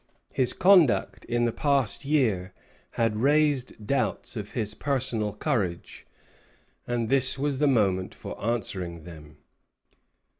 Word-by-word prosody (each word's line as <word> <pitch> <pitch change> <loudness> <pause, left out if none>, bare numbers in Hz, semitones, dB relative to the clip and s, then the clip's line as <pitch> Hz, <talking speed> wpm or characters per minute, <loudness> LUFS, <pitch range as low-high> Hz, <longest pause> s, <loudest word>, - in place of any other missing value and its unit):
His 130 -2 +2
conduct 185 -8 +3
in 120 0 0
the 120 - +1
past 140 -1 0
year 110 -11 0 0.4
had 115 -2 0
raised 140 -3 +1
doubts 125 -1 -2
of 105 -2 -6
his 105 -4 -2
personal 125 -6 -1
courage; 100 - -3 0.8
and 120 -2 -1
this 130 +1 +4
was 140 -1 -1
the 150 - +3
moment 100 -8 +1
for - - -9
answering 95 -7 -3
them. 75 -3 -13
120 Hz, 120 wpm, -26 LUFS, 105-140 Hz, 0.8 s, this